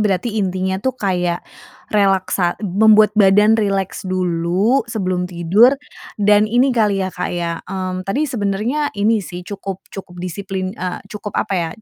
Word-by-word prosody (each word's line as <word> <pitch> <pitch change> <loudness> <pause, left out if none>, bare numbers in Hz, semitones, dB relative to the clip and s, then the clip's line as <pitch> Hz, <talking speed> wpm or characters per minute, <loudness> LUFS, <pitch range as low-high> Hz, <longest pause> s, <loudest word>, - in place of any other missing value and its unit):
berarti 205 +1 0
intinya 190 0 -1
itu 260 +2 -2
kayak 180 -5 -1 0.5
relaksa 190 -3 +1
membuat 215 +2 +5
badan 210 +1 +5
rileks 195 -3 -1
dulu 185 +7 +1
sebelum 185 -5 -2
tidur 185 +10 +4 0.4
dan 210 0 +4
ini 250 +4 +3
kali 205 -5 +1
ya, 185 - -4
Kak, - - -3
ya, 170 -1 -3
mmm 185 -1 -4
tadi 285 +10 +1
sebenernya 240 +4 -1
ini 215 +2 +2
sih, 180 -1 -8
cukup 195 -1 -7
cukup 185 -2 -9
disiplin, 185 +1 -4
eee, 185 -4 -5
cukup, 210 -1 -7
apa 200 - -1
ya, 170 -2 -1
195 Hz, 145 wpm, -18 LUFS, 185-215 Hz, 0.5 s, membuat